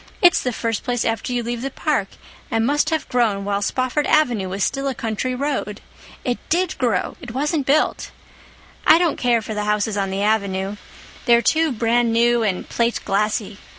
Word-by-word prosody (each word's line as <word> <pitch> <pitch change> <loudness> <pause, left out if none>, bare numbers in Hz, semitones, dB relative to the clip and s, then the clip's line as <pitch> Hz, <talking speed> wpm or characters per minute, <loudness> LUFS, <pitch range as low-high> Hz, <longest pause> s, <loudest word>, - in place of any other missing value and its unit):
It's 355 -1 +5
the 250 - -1
first 225 -2 -2
place 245 -2 -1
after 225 +2 -1
you 245 -1 -1
leave 235 0 -3
the 275 - -2
park, 270 -7 -1 0.4
and 225 0 +1
must 290 +3 +2
have 320 -1 -1
grown 220 -6 +1
while 200 0 -1
Spofford 255 +7 0
Avenue 240 -11 +2
was 195 +1 -2
still 275 0 -1
a 270 - -2
country 230 +3 -2
road. 265 -6 -2 0.5
It 245 -1 -1
did 355 +1 +1
grow—it 235 +1 -2
wasn't 295 +1 -1
built! 295 +3 +1 0.8
I 320 - +8
don't 340 -2 +1
care 235 -3 +2
for 220 - -5
the 210 0 -2
houses 210 0 0
on 195 -1 0
the 195 +1 -2
Avenue. 200 -2 0 0.5
They're 235 0 +5
too 320 -1 +2
brand 235 0 +1
new 235 +1 +3
and 200 -5 -1
plateglassy. 210 -2 -1
235 Hz, 180 wpm, -21 LUFS, 210-265 Hz, 0.8 s, I